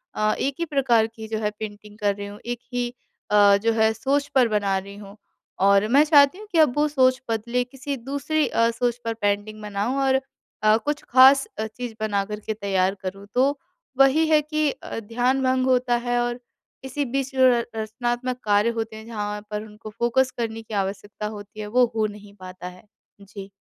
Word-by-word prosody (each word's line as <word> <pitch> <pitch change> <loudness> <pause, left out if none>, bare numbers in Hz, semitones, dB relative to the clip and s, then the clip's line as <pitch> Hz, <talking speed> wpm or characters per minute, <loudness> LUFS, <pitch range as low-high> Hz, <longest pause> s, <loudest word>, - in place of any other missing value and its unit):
अ, 215 0 +1
एक 275 0 -1
ही 335 - 0
प्रकार 255 -7 +2
की 220 -1 -10
जो 220 0 -3
है 210 -1 0
पेंटिंग 210 -1 -8
का 205 -1 +2
कर - - -6
रही 200 0 -6
हूँ, 205 +1 -10
एक 240 0 -3
ही 245 -1 -1 0.4
अ, 205 -1 +6
जो 225 +3 +1
है 220 0 +3
सोच 280 +5 0
पर 255 -3 +5
बना 205 -3 0
रही 200 +1 -7
हूँ 205 0 -11 0.5
और 200 +1 +4
मैं 280 +6 +5
चाहती 290 +2 +5
हूँ 430 - -11
कि 340 - 0
अब 300 -6 +5
वो 300 +1 +3
सोच 260 -2 +2
बदले, 235 +3 -1
किसी 270 +2 -6
दूसरी 285 +5 -1
अ, 230 0 +2
सोच 240 0 -1
पर 230 - -1
पेंटिंग 215 0 -2
बनाऊँ 210 +5 -2
और 265 0 +2 0.4
अ, 215 +1 +5
कुछ 290 +4 -3
ख़ास 265 +2 +7
अ, 220 - -1
चीज़ 230 0 -7
बना 205 -2 0
कर 210 +1 -6
के 220 - -4
तैयार 195 -2 0
करूँ। 195 +2 -6
तो 275 +3 +3 0.4
वही 270 +4 +5
है 310 -1 +4
कि 305 0 0
अ, - - -7
ध्यान 245 +5 0
भंग 255 0 +2
होता 250 -1 +2
है 245 0 +1
और 240 0 -2 0.4
इसी 265 +2 -3
बीच 270 +2 -2
जो 260 - +1
है 255 - +8
र 240 - +3
रच 235 - -4
रचनात्मक 240 +3 -3
कार्य 205 +1 +3
होते 225 -1 -4
हैं, 220 0 -10
जहाँ 210 -2 -4
पर 210 0 -3
उनको 215 0 -11
फ़ोकस 255 +2 +2
करने 225 -1 -3
की 220 -1 -11
आवश्यकता 205 +2 -3
होती 205 +1 -12
है, 210 - -5
वो 250 +3 +4
हो 215 -1 +2
नहीं 205 -1 -12
पाता 185 -1 -9
है। 180 0 -12 0.4
जी। 200 0 -10
230 Hz, 215 wpm, -23 LUFS, 210-260 Hz, 0.5 s, है